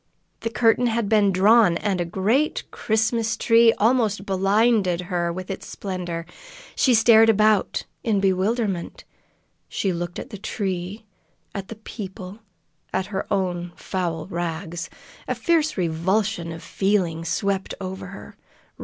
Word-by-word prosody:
The 230 Hz, -, -3 dB
curtain 230 Hz, +1 st, +3 dB
had 230 Hz, -2 st, 0 dB
been 205 Hz, -2 st, +4 dB
drawn, 195 Hz, -1 st, +5 dB
and 195 Hz, -4 st, -1 dB
a -, -, -1 dB
great 215 Hz, -, 0 dB
Christmas 220 Hz, +1 st, 0 dB
tree 230 Hz, 0 st, +5 dB
almost 215 Hz, -3 st, +1 dB
blinded 195 Hz, -1 st, +2 dB
her 175 Hz, -1 st, -1 dB
with 185 Hz, +2 st, -6 dB
its 195 Hz, -, -6 dB
splendor. 175 Hz, -4 st, -5 dB, 0.5 s
She 255 Hz, -3 st, +4 dB
stared 225 Hz, 0 st, +6 dB
about 215 Hz, -2 st, +2 dB, 0.2 s
in 215 Hz, -4 st, +1 dB
bewilderment. 195 Hz, 0 st, 0 dB, 0.7 s
She 195 Hz, -2 st, -1 dB
looked 175 Hz, 0 st, -4 dB
at -, -, -7 dB
the 205 Hz, -, -7 dB
tree, 195 Hz, 0 st, -4 dB, 0.5 s
at 195 Hz, -1 st, -5 dB
the 225 Hz, -, -8 dB
people, 195 Hz, -2 st, -8 dB, 0.5 s
at 190 Hz, -, -1 dB
her 190 Hz, -, -3 dB
own 175 Hz, -3 st, -1 dB
foul 170 Hz, -4 st, -3 dB
rags. 170 Hz, -1 st, -4 dB, 0.4 s
A -, -, -1 dB
fierce 320 Hz, -5 st, +1 dB
revulsion 180 Hz, +2 st, 0 dB
of 165 Hz, 0 st, -8 dB
feeling 185 Hz, -5 st, 0 dB
swept 195 Hz, +3 st, -1 dB
over 190 Hz, 0 st, -6 dB
her. -, -, -11 dB
195 Hz, 135 wpm, -23 LUFS, 180-220 Hz, 0.7 s, stared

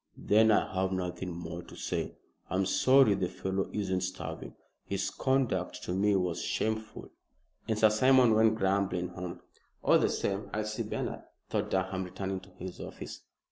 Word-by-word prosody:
"Then 110 Hz, +2 st, +4 dB
I 105 Hz, -, +3 dB
have 95 Hz, 0 st, 0 dB
nothing 90 Hz, 0 st, -3 dB
more 85 Hz, 0 st, -6 dB
to -, -, -13 dB
say. -, -, -3 dB, 0.3 s
I'm 95 Hz, +1 st, +1 dB
sorry 130 Hz, +3 st, +5 dB
the 95 Hz, -2 st, -1 dB
fellow 95 Hz, +1 st, -2 dB
isn't 95 Hz, -3 st, -1 dB
starving. 95 Hz, +1 st, -5 dB, 0.3 s
His 100 Hz, 0 st, -2 dB
conduct 130 Hz, -9 st, 0 dB
to 90 Hz, -, -3 dB
me 100 Hz, +2 st, +3 dB
was 90 Hz, -3 st, 0 dB
shameful." 110 Hz, 0 st, -2 dB, 0.6 s
And 110 Hz, -, 0 dB
Sir 110 Hz, 0 st, +5 dB
Simon 130 Hz, +1 st, +5 dB
went 110 Hz, 0 st, +4 dB
grumbling 95 Hz, -3 st, 0 dB
home. 90 Hz, 0 st, -7 dB, 0.4 s
"All -, -, +5 dB
the -, -, +2 dB
same, 100 Hz, 0 st, -2 dB
I'll 110 Hz, 0 st, -1 dB
see 110 Hz, 0 st, -3 dB
Bernard," -, -, -3 dB, 0.3 s
thought -, -, 0 dB
Durham, 95 Hz, 0 st, 0 dB
returning 95 Hz, +1 st, -4 dB
to 95 Hz, -, -16 dB
his 90 Hz, -1 st, -8 dB
office. -, -, -8 dB
95 Hz, 165 wpm, -30 LUFS, 90-110 Hz, 0.6 s, sorry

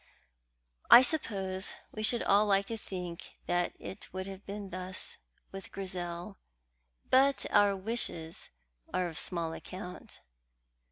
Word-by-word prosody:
I 245 Hz, -, +11 dB
suppose 195 Hz, -10 st, -1 dB, 0.2 s
we 215 Hz, -, -5 dB
should 230 Hz, +2 st, +2 dB
all 205 Hz, +2 st, +4 dB
like 195 Hz, -1 st, +3 dB
to 225 Hz, -, -3 dB
think 180 Hz, -5 st, -7 dB
that 175 Hz, 0 st, +1 dB
it 190 Hz, -, -8 dB
would 185 Hz, +1 st, -4 dB
have 195 Hz, 0 st, -8 dB
been 200 Hz, -1 st, -6 dB
thus 185 Hz, +1 st, -3 dB, 0.3 s
with 195 Hz, 0 st, -8 dB
Grizel, 180 Hz, 0 st, -4 dB, 0.7 s
but 270 Hz, +1 st, +5 dB
our 205 Hz, -1 st, +5 dB
wishes 190 Hz, -6 st, -2 dB, 0.4 s
are 180 Hz, -1 st, +1 dB
of 160 Hz, -3 st, -4 dB
small 170 Hz, -3 st, -2 dB
account. 180 Hz, +1 st, -9 dB
190 Hz, 125 wpm, -32 LUFS, 180-205 Hz, 0.7 s, I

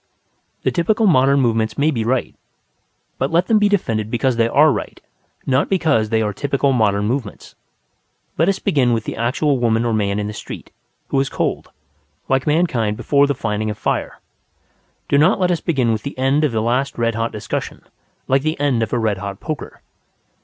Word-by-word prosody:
The -, -, +1 dB
typical 215 Hz, +5 st, +1 dB
modern 140 Hz, -5 st, +4 dB
movements 115 Hz, -3 st, 0 dB
may 150 Hz, +2 st, +2 dB
be 115 Hz, -6 st, -2 dB
right; 125 Hz, +3 st, -1 dB, 0.9 s
but 135 Hz, -, 0 dB
let 170 Hz, +2 st, +2 dB
them 215 Hz, +2 st, +3 dB
be 210 Hz, 0 st, +3 dB
defended 115 Hz, -, -1 dB
because 125 Hz, +2 st, 0 dB
they 115 Hz, 0 st, +2 dB
are 150 Hz, +6 st, +5 dB
right, -, -, -5 dB, 0.5 s
not 135 Hz, +1 st, +1 dB
because 155 Hz, -, +1 dB
they 110 Hz, 0 st, +1 dB
are 105 Hz, -1 st, -2 dB
typical 140 Hz, +4 st, 0 dB
modern 105 Hz, -4 st, +1 dB
movements. 120 Hz, -1 st, -4 dB, 0.8 s
Let 165 Hz, +5 st, +2 dB
us 195 Hz, -, +1 dB
begin 125 Hz, -4 st, +1 dB
with 115 Hz, -2 st, -1 dB
the -, -, -5 dB
actual 130 Hz, +4 st, 0 dB
woman 115 Hz, -1 st, +1 dB
or 115 Hz, -, 0 dB
man 100 Hz, -2 st, 0 dB
in 105 Hz, -, -2 dB
the 105 Hz, -, -5 dB
street, -, -, -9 dB, 0.4 s
who 135 Hz, -, +1 dB
is 135 Hz, 0 st, 0 dB
cold; -, -, -2 dB, 0.6 s
like 135 Hz, +1 st, 0 dB
mankind 130 Hz, -10 st, +1 dB
before 140 Hz, +3 st, +2 dB
the 140 Hz, -, -1 dB
finding 110 Hz, -2 st, -2 dB
of 105 Hz, -, -4 dB
fire. -, -, -2 dB, 0.9 s
Do 140 Hz, -, +3 dB
not 160 Hz, +6 st, +4 dB
let 180 Hz, -1 st, +2 dB
us 170 Hz, -, -1 dB
begin 130 Hz, -8 st, +1 dB
with 110 Hz, -1 st, -1 dB
the 140 Hz, -, -7 dB
end 135 Hz, +3 st, +2 dB
of 150 Hz, -, +2 dB
the 110 Hz, -1 st, -1 dB
last 130 Hz, +4 st, -1 dB
red 115 Hz, -1 st, 0 dB
hot 115 Hz, +1 st, -2 dB
discussion 105 Hz, -, -5 dB, 0.4 s
like 135 Hz, +1 st, +2 dB
the 155 Hz, +1 st, -2 dB
end 140 Hz, -5 st, +1 dB
of 110 Hz, -, -2 dB
a -, -, +2 dB
red 110 Hz, -4 st, 0 dB
hot 100 Hz, 0 st, -6 dB
poker. 155 Hz, -2 st, -6 dB
130 Hz, 195 wpm, -19 LUFS, 110-145 Hz, 0.9 s, are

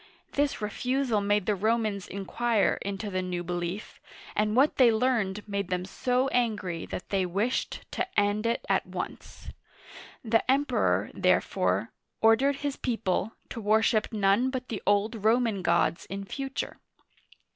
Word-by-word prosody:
This 280 Hz, -6 st, 0 dB
re 210 Hz, -, -1 dB
fusal 250 Hz, -4 st, 0 dB
made 205 Hz, -1 st, +2 dB
the 210 Hz, -, +2 dB
Romans 215 Hz, -1 st, 0 dB
inquire 215 Hz, +3 st, 0 dB
into 200 Hz, +1 st, -4 dB
the 185 Hz, 0 st, 0 dB
new 180 Hz, -1 st, -3 dB
belief, 175 Hz, +3 st, -4 dB, 0.4 s
and 210 Hz, +1 st, +1 dB
what 275 Hz, +4 st, +4 dB
they 250 Hz, -3 st, +7 dB
learned 220 Hz, -4 st, 0 dB
made 200 Hz, -2 st, -2 dB
them 180 Hz, 0 st, -1 dB
so 250 Hz, +6 st, 0 dB
angry 205 Hz, -10 st, -1 dB
that -, -, -6 dB
they 195 Hz, -2 st, +1 dB
wished 200 Hz, +8 st, -1 dB
to 370 Hz, -, -1 dB
end 205 Hz, +2 st, +1 dB
it 235 Hz, -, -1 dB
at -, -, +1 dB
once. -, -, -7 dB, 0.8 s
The 225 Hz, 0 st, +3 dB
Emperor, 280 Hz, +2 st, +2 dB
therefore, -, -, +1 dB, 0.3 s
ordered 235 Hz, +6 st, +4 dB
his 285 Hz, -1 st, -1 dB
people, 225 Hz, -4 st, -1 dB, 0.2 s
to 230 Hz, -, -6 dB
worship 215 Hz, +1 st, +3 dB
none 210 Hz, +4 st, +3 dB
but 260 Hz, -1 st, -5 dB
the 215 Hz, -, -4 dB
old 205 Hz, +2 st, +1 dB
Roman 225 Hz, -2 st, +2 dB
gods 170 Hz, 0 st, +1 dB
in 195 Hz, 0 st, -5 dB
future. 270 Hz, +5 st, -4 dB
215 Hz, 145 wpm, -28 LUFS, 195-240 Hz, 0.8 s, they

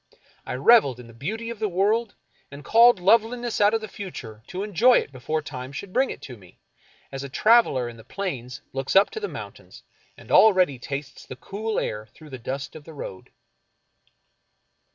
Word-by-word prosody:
I -, -, -3 dB
reveled 140 Hz, -, +5 dB
in 125 Hz, -, -10 dB
the 115 Hz, -, -14 dB
beauty 220 Hz, -, -5 dB
of 230 Hz, -, -8 dB
the 215 Hz, -1 st, -1 dB
world, 205 Hz, +5 st, +1 dB, 0.3 s
and 140 Hz, 0 st, -11 dB
called 235 Hz, -1 st, +6 dB
loveliness 230 Hz, +4 st, +2 dB
out 205 Hz, +2 st, +5 dB
of 225 Hz, -, -1 dB
the 215 Hz, -, -6 dB
future 140 Hz, -, -9 dB
to 185 Hz, +2 st, -5 dB
enjoy 225 Hz, +5 st, +4 dB
it -, -, -2 dB
before 145 Hz, +4 st, -3 dB
time 130 Hz, -1 st, -7 dB
should 185 Hz, +7 st, -8 dB
bring 265 Hz, +1 st, +2 dB
it -, -, -8 dB
to 125 Hz, -3 st, -9 dB
me, 90 Hz, -4 st, -19 dB, 0.5 s
as 135 Hz, 0 st, -5 dB
a 140 Hz, -, -6 dB
traveler 215 Hz, -, +3 dB
in 120 Hz, -1 st, -9 dB
the 115 Hz, -, -13 dB
plains 130 Hz, -, -5 dB
looks 135 Hz, +4 st, -3 dB
up 195 Hz, +1 st, +6 dB
to -, -, -5 dB
the 420 Hz, -, -3 dB
mountains, -, -, -10 dB, 0.3 s
and -, -, -13 dB
already 185 Hz, -, +5 dB
tastes 140 Hz, +2 st, -7 dB
the -, -, -8 dB
cool 210 Hz, -, -4 dB
air 105 Hz, 0 st, -4 dB
through 150 Hz, +6 st, -16 dB
the 130 Hz, -, -7 dB
dust 135 Hz, +4 st, -5 dB
of 155 Hz, -, -10 dB
the 160 Hz, +1 st, -12 dB
road. 95 Hz, -9 st, -8 dB
170 Hz, 195 wpm, -24 LUFS, 130-220 Hz, 0.5 s, called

